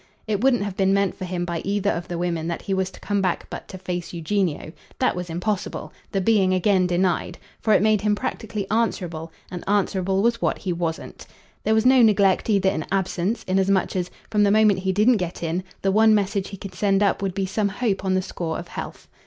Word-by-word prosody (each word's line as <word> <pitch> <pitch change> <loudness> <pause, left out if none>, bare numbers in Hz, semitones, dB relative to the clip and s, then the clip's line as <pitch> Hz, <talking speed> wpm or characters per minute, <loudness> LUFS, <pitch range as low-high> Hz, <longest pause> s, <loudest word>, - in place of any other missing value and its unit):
It 210 -2 -1
wouldn't 250 -4 +3
have 200 -2 -4
been 195 -1 +2
meant 200 -1 +1
for 185 - -6
him 180 -1 -3
by 170 -1 -3
either 200 +2 0
of 170 +1 -4
the 175 - -4
women 170 -2 -2
that 170 - -4
he 195 - -2
was 190 -1 0
to - - -14
come 205 -1 -1
back 185 -2 -1
but - - -7
to 185 - -8
face 180 -2 -5
Eugenio. 170 -2 -1 0.3
That 255 - +1
was 180 -1 -5
impossible 185 +4 -3 0.2
the 195 - 0
being 190 -2 +3
again 185 0 +3
denied; 180 0 0 0.2
for 220 - 0
it - - +3
made 215 -2 +3
him 210 0 +2
practically 210 -1 -4
answerable, 175 -8 -1 0.2
and 180 -1 -6
answerable 195 -1 +1
was 235 0 +1
what - - +1
he 185 -3 -3
wasn't. 165 -1 -4 0.4
There 220 - +2
was 220 +2 +2
no 255 0 +6
neglect 200 -3 +4
either 195 -2 +3
in 155 - -3
absence, 190 +2 -1
inasmuch 190 +1 +1
as, 180 -1 -1 0.2
from 210 -1 +2
the 205 - +5
moment 210 -2 +4
he 190 0 0
didn't 215 +5 +4
get 180 -2 -4
in, 170 +3 -1 0.2
the 195 - +2
one 220 +2 +5
message 200 -1 0
he 195 - -8
could 190 0 -8
send 195 +1 +2
up 200 - +1
would 195 -2 -2
be 195 -1 0
some 200 +2 0
hope 200 -1 -1
on 190 -1 +1
the 185 - +1
score 170 -3 -4
of 170 - -8
health. - - -7
195 Hz, 225 wpm, -23 LUFS, 180-205 Hz, 0.4 s, no